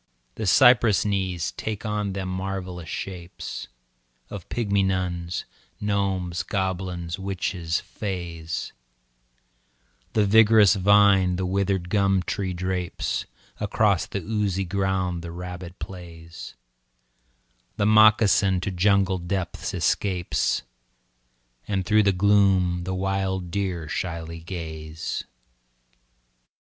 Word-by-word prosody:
The 110 - -4
cypress 120 -1 +5
knees 95 -4 -1
take 110 0 -5
on 105 -2 -1
them 95 -1 -4
marvellous 95 -2 -4
shapes 90 -2 -6 0.6
Of 100 -4 -8
pygmy 100 -4 +1
nuns, 90 -2 -2 0.3
gnomes, 95 -4 -1
goblins, 95 -2 -3
witches, 90 -3 -2
fays, 85 -5 -5 1.4
The 105 -2 +3
vigorous 110 -1 +6
vine 100 -2 +4
the 95 +1 -2
withered 95 -1 0
gum 95 -2 +2
tree 95 +1 -2
drapes, 90 0 -2 0.3
Across - - +1
the - - -4
oozy 100 -3 -1
ground 95 -2 -1
the 85 - -7
rabbit 90 +1 -7
plays, 85 -5 -9 1.2
The 100 - +1
moccasin 105 -3 +5
to 100 - -2
jungle 95 0 +2
depths 90 0 -3
escapes, 90 -4 0 1.0
And 95 -2 -1
through 110 +1 +4
the 100 -1 +3
gloom 95 -2 +3
the 95 0 -2
wild 95 -1 -2
deer 90 -5 -2
shyly 85 0 -4
gaze. 80 -2 -5
95 Hz, 100 wpm, -25 LUFS, 90-100 Hz, 1.4 s, vigorous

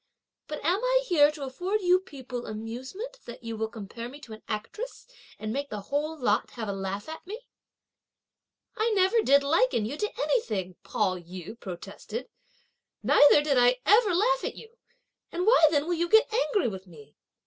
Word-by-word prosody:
But 300 -1 -6
am 370 +8 +2
I - - +3
here 300 -8 +5
to 300 -2 -7
afford 360 +11 -2
you 365 0 +4
people 260 -8 -8
amusement 260 - -6
that 240 0 -10
you 230 0 -4
will 220 0 -2
compare 225 +2 -8
me 280 +3 -11
to 230 - -10
an 215 - -11
actress, 420 - -5 0.3
and 215 0 -4
make 280 +2 -3
the 210 -1 -5
whole 305 +2 0
lot 255 - +1
have 225 -3 -5
a 200 - -2
laugh 195 +1 -4
at 320 +2 -8
me?" 445 +5 -7 1.3
"I 440 +2 +1
never 385 +4 +4
did 280 -5 +4
liken 305 - +2
you 270 +7 -4
to 420 +5 -3
anything," 205 - 0
Pao 185 -4 -1
yü 180 +5 -9
protested, 200 +6 -7 0.7
"neither 290 0 +6
did 280 -4 +2
I 245 +1 +4
ever 415 +1 +5
laugh - - +2
at - - -3
you! 455 +1 -13 0.6
and 355 +2 -2
why 435 -8 +7
then 295 -2 +1
will 350 - 0
you 345 0 -1
get 440 +2 +5
angry 435 - +1
with 190 -3 -6
me?" 150 -4 -15
285 Hz, 180 wpm, -27 LUFS, -, 1.3 s, why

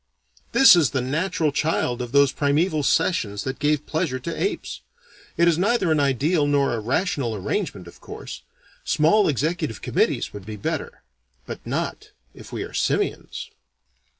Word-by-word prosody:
This 270 -8 +8
is 160 -7 +3
the 130 - -1
natural 155 +4 0
child 140 -5 0
of 120 -1 -5
those 140 -1 +4
primeval 155 +3 +1
sessions 105 - 0
that 130 0 -4
gave 150 0 +1
pleasure 155 -5 -1
to 165 +6 -4
apes. 400 - -3 0.6
It 170 - +4
is 170 -1 +3
neither 200 -3 +2
an 155 - +3
ideal 145 +3 +2
nor 140 -3 +2
a 115 - -2
rational 130 - -1
arrangement, 100 - -3
of 85 - -15
course. - - -9 0.4
Small 165 +7 +3
executive 155 - -2
committees - - 0
would 105 -1 -8
be 110 - -5
better. 100 - -4 0.4
But - - -8
not - - -4 0.2
if - - -13
we - - -4
are - - -9
simians. - - -2
145 Hz, 155 wpm, -23 LUFS, 130-170 Hz, 0.6 s, This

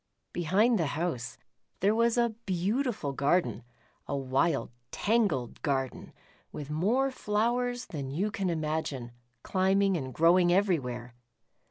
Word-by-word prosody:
Behind 200 +7 +2
the 165 - +1
house 130 -8 -3 0.4
there 200 +3 +3
was 230 +1 +2
a 235 -1 +2
beautiful 195 - -1
garden, 145 +2 +1 0.5
a 140 - -1
wild 135 -1 0 0.2
tangled 200 - 0
garden, 135 -3 -2 0.4
with 150 0 -7
more 230 - +1
flowers 245 +2 0
than 140 -4 -5
you 185 +10 -1
can 195 -4 -1
imagine, 155 -6 -2 0.3
climbing 195 +1 +2
and 130 -6 -3
growing 175 +4 +4
everywhere. 130 - 0
175 Hz, 120 wpm, -29 LUFS, 140-210 Hz, 0.5 s, growing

